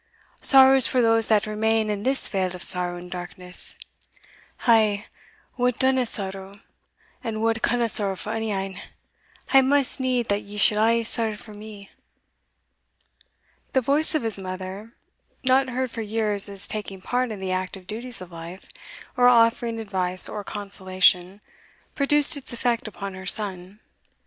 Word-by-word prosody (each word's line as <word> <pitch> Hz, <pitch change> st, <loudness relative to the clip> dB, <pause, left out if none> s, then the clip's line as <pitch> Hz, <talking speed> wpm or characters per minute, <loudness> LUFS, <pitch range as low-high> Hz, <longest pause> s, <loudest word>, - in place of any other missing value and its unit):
Sorrow 265 Hz, 0 st, +7 dB
is 260 Hz, -, +3 dB
for 255 Hz, -, 0 dB
those 225 Hz, -1 st, +3 dB
that 215 Hz, -2 st, +2 dB
remain 215 Hz, 0 st, 0 dB
in 205 Hz, -1 st, -4 dB
this 265 Hz, +4 st, 0 dB
vale 185 Hz, -2 st, -2 dB
of 180 Hz, -, -7 dB
sorrow 180 Hz, -1 st, +2 dB
and 175 Hz, 0 st, -11 dB
darkness 180 Hz, 0 st, +1 dB, 0.9 s
I, 215 Hz, -3 st, +3 dB, 0.5 s
wha 250 Hz, 0 st, +2 dB
dinna 260 Hz, -2 st, +2 dB
sorrow, 195 Hz, -1 st, -3 dB, 0.6 s
and 225 Hz, -3 st, -4 dB
wha 225 Hz, 0 st, +2 dB
canna 240 Hz, -1 st, +1 dB
sorrow 200 Hz, -3 st, +4 dB
for 205 Hz, +4 st, -6 dB
ony 225 Hz, -1 st, -3 dB
ane, 195 Hz, 0 st, -4 dB, 0.7 s
hae 270 Hz, -, +7 dB
maist 275 Hz, 0 st, +1 dB
need 255 Hz, -2 st, -1 dB
that 200 Hz, 0 st, 0 dB
ye 205 Hz, +1 st, -11 dB
should 210 Hz, +1 st, +4 dB
a' 230 Hz, +1 st, +2 dB
sorrow 225 Hz, -1 st, -2 dB
for 210 Hz, +1 st, -13 dB
me." 205 Hz, -1 st, -12 dB, 1.8 s
The 260 Hz, -, +3 dB
voice 295 Hz, +6 st, 0 dB
of 310 Hz, -, 0 dB
his 220 Hz, -3 st, -2 dB
mother, 190 Hz, +4 st, -8 dB, 0.5 s
not 260 Hz, +1 st, +2 dB
heard 255 Hz, 0 st, -3 dB
for 230 Hz, -, -5 dB
years 210 Hz, -2 st, -1 dB
as 200 Hz, -1 st, -6 dB
taking 205 Hz, -3 st, -6 dB
part 250 Hz, +6 st, -2 dB
in 215 Hz, -3 st, -7 dB
the 190 Hz, -1 st, -4 dB
active 185 Hz, 0 st, -4 dB
duties 230 Hz, +3 st, -6 dB
of 180 Hz, -1 st, -10 dB
life, 170 Hz, +3 st, -10 dB, 0.5 s
or 245 Hz, -1 st, +4 dB
offering 230 Hz, -1 st, +3 dB
advice 185 Hz, -4 st, -1 dB
or 210 Hz, -, -6 dB
consolation, 190 Hz, -1 st, 0 dB, 0.5 s
produced 295 Hz, +1 st, +4 dB
its 285 Hz, -, -7 dB
effect 240 Hz, 0 st, -2 dB
upon 200 Hz, -1 st, -7 dB
her 190 Hz, 0 st, -9 dB
son. 195 Hz, -2 st, -2 dB
215 Hz, 155 wpm, -23 LUFS, 190-240 Hz, 1.8 s, Sorrow